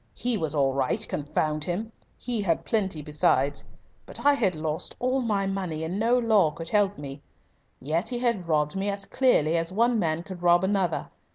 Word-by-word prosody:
He 245 -1 +1
was 160 -6 -1
all 135 -2 +2
right 135 -1 0
confound 150 +1 -2
him! 210 +6 -3 0.3
He 240 -3 -2
had 170 -5 0
plenty 190 -8 0
besides. 145 -2 +1 0.4
But - - -6
I 290 - +7
had 205 - +1
lost 155 0 -3
all 255 +2 0
my 205 -5 0
money 185 -5 -3
and 175 +5 -3
no 235 +3 +3
law 220 -8 +4
could 165 +2 -7
help 205 -1 +2
me. 140 0 -8 0.6
Yet 165 - -1
he 245 - -2
had 235 -8 0
robbed 150 -1 +1
me 195 +1 -1
as 200 0 -3
clearly 210 - +2
as 165 +1 -1
one 230 +3 +2
man 165 -2 0
could 185 -1 -9
rob 175 +1 +4
another. 190 -4 0
185 Hz, 190 wpm, -26 LUFS, 155-220 Hz, 0.6 s, I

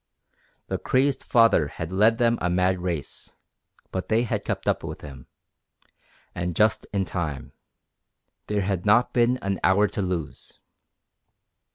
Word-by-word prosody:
The - - -3
crazed 130 +1 +1
father 115 -10 +4
had 85 +3 -7
led 110 +4 +3
them 115 0 +2
a 90 - 0
mad 90 +1 +1
race, 85 -4 -5 0.6
but 95 - -4
they 110 +2 +3
had 120 - -2
kept - - -4
up - - +1
with - - -7
him. 70 -3 -11 1.1
And 90 -1 -3
just 110 0 +2
in 100 -2 0
time. 80 -7 -4 1.0
There 105 -1 0
had 95 -2 -2
not 105 +4 +3
been 120 +1 +3
an 100 0 -1
hour 100 +2 +4
to - - -3
lose. 90 -5 -4
95 Hz, 145 wpm, -25 LUFS, 90-115 Hz, 1.1 s, father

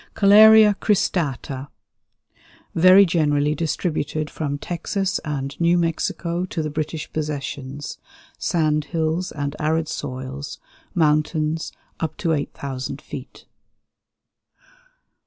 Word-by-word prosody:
Koeleria 215 +1 +8
cristata. 145 - -1 1.1
Very 185 +4 +7
generally 150 -4 +1
distributed 155 -1 -2
from 145 -2 -3
Texas 185 +4 -2
and 140 -3 -4
New 170 +1 +4
Mexico 170 +1 -1
to 165 -3 -3
the 155 - -3
British 155 +1 -4
Possessions; 145 -2 -5 0.4
sand 155 -3 +1
hills 165 +2 -1
and 145 0 -4
arid 155 +1 0
soils; 135 0 -6 0.4
mountains, 155 0 +1 0.3
up 160 -1 -3
to 165 -3 0
8,000 140 -2 -4
feet. 135 -2 -10
155 Hz, 95 wpm, -22 LUFS, 145-170 Hz, 1.1 s, Koeleria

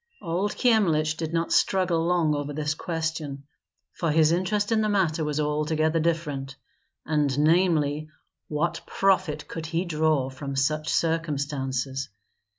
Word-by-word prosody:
Old 180 +4 -1
Kyemlich 165 - +2
did 160 -1 -4
not 165 0 -1
struggle 180 -4 +2
long 170 -3 +2
over 145 0 -3
this 150 0 -1
question, 160 -4 -4 0.5
for 165 - -2
his 155 +1 +4
interest 205 +5 0
in 220 -1 +3
the 215 - +1
matter 170 -6 +1
was 150 0 -1
altogether 155 +2 +1
different; 150 -5 -2 0.5
and 150 -3 +1
namely, 155 -2 +2 0.4
what 155 +3 -1
profit 185 -6 +1
could 160 -1 -6
he 165 +3 -1
draw 155 -5 +1
from 140 +1 -6
such 155 +3 0
circumstances? 140 -5 -1
155 Hz, 135 wpm, -26 LUFS, 150-170 Hz, 0.5 s, his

